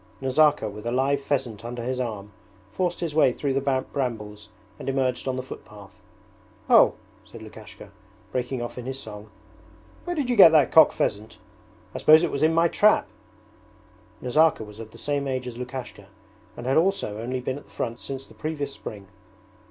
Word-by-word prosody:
Nazarka, 140 -1 +3
with 105 +2 -7
a - - -1
live 135 +3 +1
pheasant 130 -6 -2
under 120 0 -6
his 130 +1 -2
arm, 105 -4 -4 0.4
forced 175 - -2
his 165 -3 -2
way 150 -4 +4
through 135 +2 -2
the 135 - 0
brambles 120 -6 -3 0.3
and - - -4
emerged 130 -1 -1
on 130 - 0
the 130 - -4
footpath. 105 -5 -12 0.7
'Oh!' - - +6 0.3
said - - -12
Lukashka, - - -12 0.4
breaking 125 0 -2
off 120 - -6
in 125 - -7
his 135 0 -4
song, 105 -4 -9 0.8
'where 350 0 -3
did 290 -5 -1
you 245 - +1
get 195 -6 +10
that 150 -4 +5
cock 160 -2 +7
pheasant? 110 +2 -3 0.6
I - - -5
suppose 155 +2 +7
it 175 - 0
was 140 - -3
in 155 +1 +4
my 165 +1 +3
trap?' 210 +5 +3 1.1
Nazarka 155 +1 +3
was 105 0 -12
of 115 -1 -8
the - - -15
same 145 -1 -2
age 130 -1 -2
as 125 -2 -6
Lukashka 125 -5 -7 0.5
and 120 - -7
had 130 +2 +2
also 165 - +1
only 125 +2 -3
been 130 +2 -4
at - - -18
the - - -24
front 115 +1 -4
since 135 0 -7
the - - -17
previous 145 -3 -4
spring. 105 -7 -9
130 Hz, 185 wpm, -25 LUFS, 115-145 Hz, 1.1 s, get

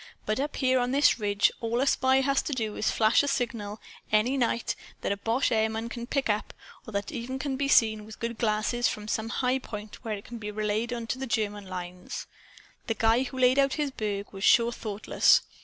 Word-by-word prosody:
But 215 +3 0
up 290 +2 -2
here 260 -1 +2
on 245 0 0
this 275 -2 +4
ridge, 205 -1 +2
all 230 +1 0
a 270 - +2
spy 265 -1 +3
has 275 0 +2
to 295 - -3
do 220 -4 -2
is - - -1
to - - +2
flash 220 0 +4
a 285 - -2
signal, 230 -6 -2 0.3
any 215 +5 +3
night, 235 -3 0 0.3
that - - -1
a 200 - 0
boche 230 +6 0
airman 220 0 0
can 235 0 -6
pick 275 +1 0
up 210 -1 -1 0.3
or - - -7
that 200 0 -1
can - - -5
even 265 +3 -3
be 275 +1 -1
seen 220 -5 +4
with 215 0 -11
good 230 -1 -4
glasses 225 +2 +1
from 210 0 -4
some 220 +1 -2
high 255 +2 +1
point 210 -3 -8
where 220 -3 -2
it 200 - -10
can 235 -1 -8
be 210 -1 -5
relayed 215 +2 -1
to 240 +1 -3
the 265 - -3
German 210 -3 -2
lines. 180 -1 -6 0.6
The 225 - 0
guy 225 +3 +3
who 260 0 -5
laid 255 +1 +4
out 275 -1 +3
this 295 -2 -1
burg 205 -4 -4
was 195 0 -7
sure 235 +1 +5
thoughtless. 215 -3 +2
230 Hz, 225 wpm, -28 LUFS, 215-255 Hz, 0.6 s, sure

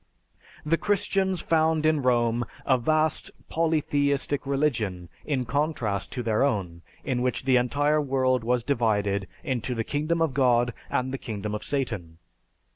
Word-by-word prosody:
The 165 +2 +2
Christians 195 -2 0
found 160 -1 +2
in 155 -2 +3
Rome 120 -2 +2 0.2
a 130 -2 +3
vast 155 +5 +1 0.2
polytheistic 145 -3 0
religion 115 - -1 0.2
in 135 -4 -1
contrast 120 -7 -1
to 125 - -3
their 110 -2 +1
own 95 -11 -1 0.2
in 125 -3 -1
which 125 0 -1
the 130 -1 +4
entire 145 +5 +2
world 130 -3 +1
was 120 0 +1
divided 105 -7 0 0.2
into 130 -4 -2
the 115 - -1
Kingdom 155 +6 -1
of 165 -4 +1
God 120 -2 +3 0.2
and 130 +1 -1
the 135 - -3
Kingdom 105 -3 -5
of 105 - -4
Satan. 110 - -3
130 Hz, 145 wpm, -26 LUFS, 115-150 Hz, 0.2 s, the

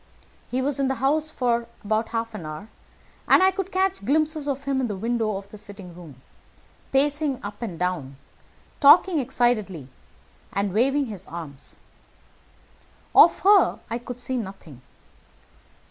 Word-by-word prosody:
"He 255 +1 -1
was 280 +1 -1
in 275 - +2
the 265 - 0
house 300 +5 0
about 235 -3 -1
half 230 0 -3
an 215 - -7
hour, 155 +8 -8 0.6
and - - +6
I 380 - +5
could 385 0 -4
catch 380 - 0
glimpses 310 +4 +1
of 275 -1 -2
him 275 -1 0
in 250 - 0
the 210 - -4
windows 220 0 -1
of - - -23
the 210 - -10
sitting 200 -4 -11
room, 155 -7 -13 0.7
pacing 285 0 +2
up 205 +2 -7
and 200 -8 -5
down, 160 -7 -3 0.6
talking 315 +4 +6
excitedly 230 - -1 0.6
and 200 -1 -1
waving 270 +6 +2
his 205 -6 -9
arms. 155 -5 -8 1.4
Of 340 - +7
her 400 +1 +5
I 235 - -2
could 245 0 -8
see 255 +1 -3
nothing. 190 - -8
235 Hz, 145 wpm, -24 LUFS, 195-280 Hz, 1.4 s, Of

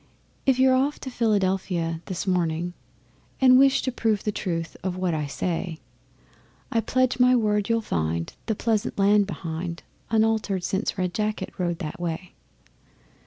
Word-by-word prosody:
If 265 -2 +4
you're 260 0 +5
off 275 +3 +2
to 260 - -6
Philadelphia 190 -7 0
this 185 -3 -4
morning, 175 -2 0 0.7
And 255 -1 +7
wish 275 0 +4
to 260 - 0
prove 220 -4 0
the 210 - 0
truth 165 -5 -3
of 185 -1 -2
what 185 -2 0
I 150 -2 -1
say, 170 +3 -3 0.9
I 230 - +2
pledge 255 +3 +1
my 250 0 +6
word 210 -3 +1
you'll 230 0 +2
find 80 - -2
the 220 - 0
pleasant 220 -1 -1
land 200 0 +4
behind 170 -1 -5 0.3
Unaltered 220 -4 +1
since 195 +3 -1
Red 180 -1 -1
Jacket 215 +1 -2
rode 175 -2 0
that 160 -2 -6
way. 175 +1 -4
195 Hz, 155 wpm, -25 LUFS, 170-225 Hz, 0.9 s, And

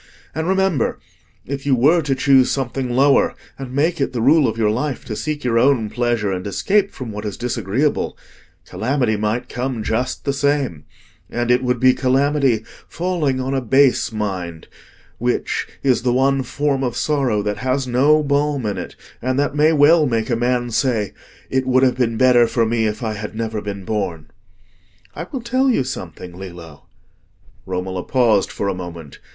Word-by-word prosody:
And 160 +1 -2
remember, 190 -8 +1 0.5
if 135 +1 -5
you 140 -2 +2
were 150 +8 +4
to 140 -3 -1
choose 130 -1 +4
something 130 -1 -2
lower, 135 +3 +3 0.2
and 135 -2 -6
make 150 +4 0
it 135 - -1
the 120 - -2
rule 145 +4 +5
of 110 - -3
your 110 -2 +2
life 135 +5 -3
to 110 - -5
seek 150 +4 -4
your 115 -2 +2
own 125 -4 +2
pleasure 120 -4 0
and 90 +1 -3
escape 200 - +1
from 125 -4 -7
what 105 0 -6
is 105 -3 -5
disagreeable, 125 +4 -1 0.5
calamity 115 +3 0
might 105 +3 -2
come 125 -2 -3
just 125 +4 -2
the 140 - 0
same; 140 - -1 0.4
and 120 0 -1
it 125 +1 +3
would 125 -1 0
be 130 +1 +5
calamity 135 -3 +1 0.2
falling 165 -7 -1
on 130 +1 -2
a 135 - 0
base 135 +2 +3
mind, 95 -6 -4 0.5
which, 120 +2 -1 0.2
is 130 -3 +2
the 125 - +1
one 135 +1 +2
form 140 +1 -1
of 125 -2 -2
sorrow 135 -9 0
that 105 0 -2
has 130 +1 -1
no 140 +5 +3
balm 145 -2 0
in 105 -2 -2
it, - - -7 0.3
and 130 +2 -1
that 145 0 +1
may 150 +2 +4
well 155 +1 +5
make 115 -1 -1
a - - +3
man 120 0 0
say, 110 -4 0 0.4
'It 130 0 0
would 130 0 +3
have 130 -1 +2
been 115 -3 0
better 125 -2 +5
for 115 -1 +1
me 110 0 +1
if 105 +2 -4
I 110 -1 -1
had 105 +1 -6
never 110 -1 -3
been 100 -2 -6
born.' 85 -8 -3 0.8
I 165 +3 -6
will 265 - -4
tell 255 +3 +1
you 230 - +2
something, 90 - -7
Lillo." 85 -5 -11 0.8
Romola 95 0 -3
paused 115 -4 +2
for 100 - -3
a 100 - 0
moment. 85 -5 -9
125 Hz, 180 wpm, -20 LUFS, 110-140 Hz, 0.8 s, rule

